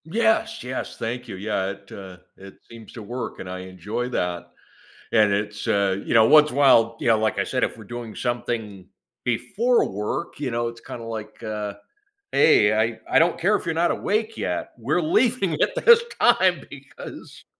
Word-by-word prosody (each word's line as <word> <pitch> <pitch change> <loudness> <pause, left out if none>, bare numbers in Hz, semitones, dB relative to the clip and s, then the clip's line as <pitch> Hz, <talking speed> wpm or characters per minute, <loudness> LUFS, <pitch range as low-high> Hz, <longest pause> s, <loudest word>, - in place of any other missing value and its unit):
Yes, 225 +4 +1
yes, 130 +1 -5
thank 120 +2 -4
you. 105 - -7
Yeah, 95 -1 -2
it, 100 0 -13
uh, 95 -2 -10 0.2
it 95 0 -13
seems 115 -2 -13
to 115 - -8
work 120 +4 -6
and 90 - -7
I 90 0 -5
enjoy 95 +6 -5
that, 90 -7 -2 0.7
and 105 -3 +4
it's, 105 +1 -3
uh, 100 -2 +2
you - - -4
know, 110 -2 +6
once 150 +3 +6
in - - -7
a - - -1
while, 115 -5 +5
you - - -1
know, 110 -1 +5
like 110 -2 0
I - - +1
said, - - 0
if - - -3
we're 110 - -11
doing 120 0 -7
something 110 -6 -4 0.4
before 200 - +1
work, 105 - -4
you 140 -3 -3
know, 120 0 -1
it's, 115 0 -10
kinda, 115 0 -8
like, 110 -1 -7
uh, 105 -1 -4 0.6
"Hey, 105 -9 +5
I 110 +1 0
I - - +3
don't 165 +1 +2
care 200 +5 +3
if - - -3
you're 165 - -1
not 170 +1 +2
awake 220 +2 -1
yet, 90 -1 -3
we're 135 +9 0
leaving 195 +2 +2
at - - +2
this 470 0 +8 0.2
time - - +3
because" - - -11
115 Hz, 195 wpm, -23 LUFS, 105-150 Hz, 0.7 s, this